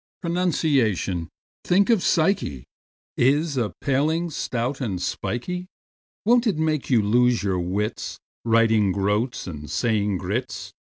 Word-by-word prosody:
Pronunciation—think 160 - 0
of 225 -5 +3
psyche!— 155 - +1 0.5
Is 145 +4 +2
a 115 -5 0
paling, 155 +5 +1
stout 130 0 -2
and 100 -8 -2
spikey; 180 - -3 0.6
Won't 240 +2 +4
it 200 - +1
make 155 -2 0
you 120 -5 +4
lose 120 +2 +3
your 95 -3 0
wits, 100 +6 -3 0.3
Writing 110 -4 +3
"groats" 105 +5 -1
and 75 -4 -7
saying 105 -4 0
groats? 105 +8 -4
120 Hz, 115 wpm, -24 LUFS, 105-160 Hz, 0.6 s, Won't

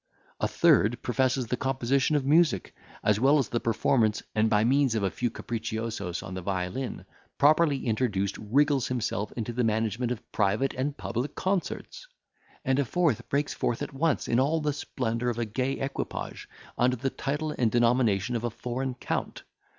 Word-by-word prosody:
A - - +1
third 115 +4 +3
professes 130 +1 +1
the 125 +2 -2
composition 135 +3 +1
of 140 -2 +1
music, 155 +1 +3 0.3
as 105 -1 +3
well 140 +5 +5
as 135 -6 0
the 120 - 0
performance, 115 -1 +1
and 110 +1 +2
by 105 -1 +3
means 135 0 +3
of 110 - 0
a 95 - +1
few 120 - -1
capriciosos 110 -5 -4
on 95 - -7
the 95 - -4
violin, 95 +7 -3 0.3
properly 150 -1 +4
introduced, 110 -4 0
wriggles 140 +5 +2
himself 110 -4 -2
into 120 0 -4
the 125 +1 0
management 115 +2 0
of 125 -1 -6
private 105 +6 +1
and 140 +3 -2
public 120 +5 -3
concerts. 195 - -3 0.6
And 135 0 +2
a - - +3
fourth 165 -4 0
breaks 145 +1 0
forth 120 - -1
at - - -6
once 150 +1 0
in 120 - +2
all 150 +5 +2
the 150 -1 0
splendour 120 -3 -2
of 120 - -2
a 120 - 0
gay 130 +5 -1
equipage, 135 0 -5 0.3
under 125 +1 +3
the 130 +2 -2
title 150 +2 -2
and 120 -3 +2
denomination 120 -2 +2
of 115 - -2
a 120 - 0
foreign 125 +3 -4
count. - - -4
125 Hz, 175 wpm, -28 LUFS, 110-135 Hz, 0.6 s, well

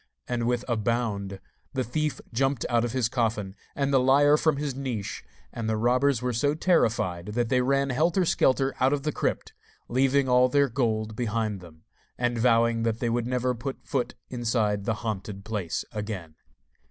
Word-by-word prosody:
And 120 -1 -1
with 120 0 0
a 120 -2 0
bound 105 -4 -1 0.4
the 130 - +1
thief 150 +5 -2
jumped 135 +1 0
out 120 -1 +2
of 120 - -1
his 125 -2 +1
coffin 110 -5 -1 0.2
and 140 0 0
the 135 - +6
liar 140 +3 +5
from 150 -1 +2
his 145 -1 -2
niche, 125 -7 -4 0.3
and 115 -1 -3
the 110 - +1
robbers 125 +2 +2
were 125 -1 0
so 145 +6 +1
terrified 110 - +1
that 120 -2 0
they 125 +1 +3
ran 140 +1 +1
helter 170 +7 +2
skelter 135 -3 +2
out 130 +2 +3
of 140 -1 -1
the 150 - 0
crypt, - - -2 0.3
leaving 135 +2 +2
all 125 0 +5
their 140 +1 +3
gold 110 -3 -1
behind 110 -3 -1
them, 80 -3 -15 0.3
and 120 -1 0
vowing 115 -1 +3
that 115 -1 0
they 120 - 0
would 120 0 0
never 125 0 0
put 130 +3 -6
foot 130 -4 -2 0.2
inside 115 -5 0
the 115 - 0
haunted 100 -1 -4
place 105 -6 -3
again. 105 -7 -5
120 Hz, 180 wpm, -27 LUFS, 110-135 Hz, 0.4 s, the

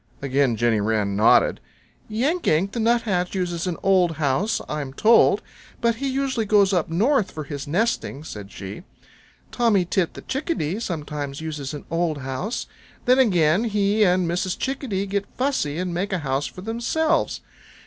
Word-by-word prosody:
Again 135 -2 +1
Jenny 115 -2 +2
Wren 105 -2 0
nodded. 105 +3 +4 0.5
"Yank 275 +12 0
Yank 175 +6 +2
the 235 - -4
Nuthatch 220 -6 +1
uses 175 -1 -2
an 175 - -2
old 185 -3 +3
house, 155 +7 0
I'm 145 -3 -4
told, 225 +9 +4 0.4
but 235 -1 +1
he 275 +3 -2
usually 260 -4 -1
goes 200 -2 +4
up 175 -4 +1
North 215 - +2
for 155 - -6
his 140 -1 -6
nesting," 175 -4 -1
said 105 -9 -8
she. 100 - -8 0.7
"Tommy 220 -7 +2
Tit 175 -1 0
the - - -9
Chickadee 260 - -2
sometimes 150 -8 -4
uses 150 -3 -5
an 145 - -9
old 165 -2 0
house. 135 - -4 0.4
Then 255 +2 +5
again 180 -4 +3
he 210 0 +2
and 180 -2 +3
Mrs. 180 +2 -1
Chickadee 255 -8 -2
get 200 0 -2
fussy 250 - 0
and 180 0 -2
make 190 +4 -2
a 190 - +1
house 135 +2 0
for 185 - -10
themselves. 235 +9 0
180 Hz, 160 wpm, -23 LUFS, 150-225 Hz, 0.7 s, Then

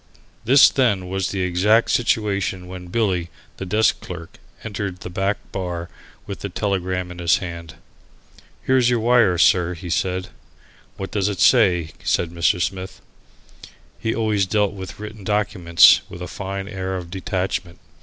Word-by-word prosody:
This 130 +4 +7
then 100 -9 +1
was 95 0 -1
the 95 -2 -2
exact 100 +6 +2
situation 100 -5 0
when 90 0 -9
Billy, 90 -4 -1 0.3
the 95 - -6
desk 110 +4 +2
clerk, 85 -2 -9 0.2
entered 100 -3 -5
the 90 - -7
back 95 +2 0
bar 90 -3 -4 0.3
with 100 - -7
the 100 - -5
telegram 95 -2 -2
in 90 - -10
his 85 -1 +3
hand. 85 -3 -7 0.9
"Here's 130 -2 +3
your 120 -1 +2
wire, 115 -5 +3
sir," 90 +1 +3
he 85 0 -7
said. 90 +1 -1 0.7
"What 95 - -6
does 105 -1 0
it 100 -4 -5
say?" 95 -7 +4
said 85 -1 0
Mr. 85 +1 +1
Smith. 95 +2 -3 1.0
He 110 - -2
always 105 -4 +1
dealt 105 0 +1
with 95 -1 -9
written 105 -1 -8
documents 95 -5 +4
with 90 - -8
a - - -5
fine 95 0 -5
air 95 -1 -4
of 85 -2 -8
detachment. 90 -1 -3
95 Hz, 155 wpm, -21 LUFS, 90-105 Hz, 1.0 s, This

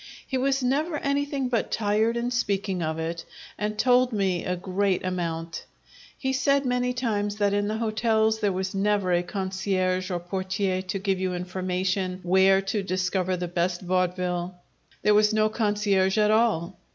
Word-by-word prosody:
He 265 - -4
was 270 +1 +1
never 295 +5 0
anything 280 -1 -1
but 240 -2 -1
tired 220 +2 +1
in 240 +1 -1
speaking 200 -5 -1
of 160 0 -2
it, 165 +1 -4 0.3
and 210 0 -3
told 250 +1 +4
me 190 -5 0
a 180 - -1
great 185 +1 -1
amount. 165 -2 -3 0.5
He 265 -1 -1
said 275 +1 +2
many 250 0 +1
times 210 -5 -1
that 205 -1 +1
in 205 0 +1
the 215 +1 -2
hotels 220 0 +1
there 205 -2 +1
was 190 +1 -3
never 200 -2 +1
a 175 - +3
concierge 185 0 -1
or 180 -2 -1
portier 185 +1 -2
to 190 +1 -4
give 195 -1 -1
you 185 -1 -1
information 185 +1 -2
where 190 +2 +4
to 200 +2 -1
discover 185 0 -1
the 180 0 -3
best 175 +1 -1
vaudeville; 180 -1 -1 0.5
there 210 - +5
was 210 +1 +4
no 215 0 +3
concierge 205 -3 +1
at 210 0 +4
all! 215 -7 +1
195 Hz, 165 wpm, -26 LUFS, 185-220 Hz, 0.5 s, there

